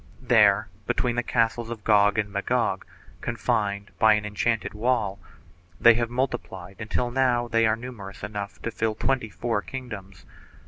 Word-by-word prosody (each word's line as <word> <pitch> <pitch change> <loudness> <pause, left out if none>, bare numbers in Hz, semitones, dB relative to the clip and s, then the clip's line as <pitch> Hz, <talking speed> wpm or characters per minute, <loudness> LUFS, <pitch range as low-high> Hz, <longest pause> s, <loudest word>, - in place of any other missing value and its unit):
There, 105 -4 +5 0.2
between 120 -2 0
the 120 - +1
castles 115 -1 0
of 115 -3 -6
Gog 105 -1 +4
and 105 -2 -1
Magog, 100 -1 0 0.4
confined 110 -3 -1
by 110 0 +6
an 105 0 -2
enchanted 105 +2 -1
wall, 105 -3 0 0.6
they 120 - +8
have 115 0 -1
multiplied 120 -7 -3
until 120 +2 -1
now 125 -2 +2
they 115 -1 +3
are 110 - +2
numerous 110 -6 -9
enough 105 -1 -5
to 115 - -2
fill 110 -1 -1
twenty 130 -1 0
four 115 +1 -2
kingdoms. 100 -8 -8
110 Hz, 150 wpm, -25 LUFS, 105-120 Hz, 0.6 s, they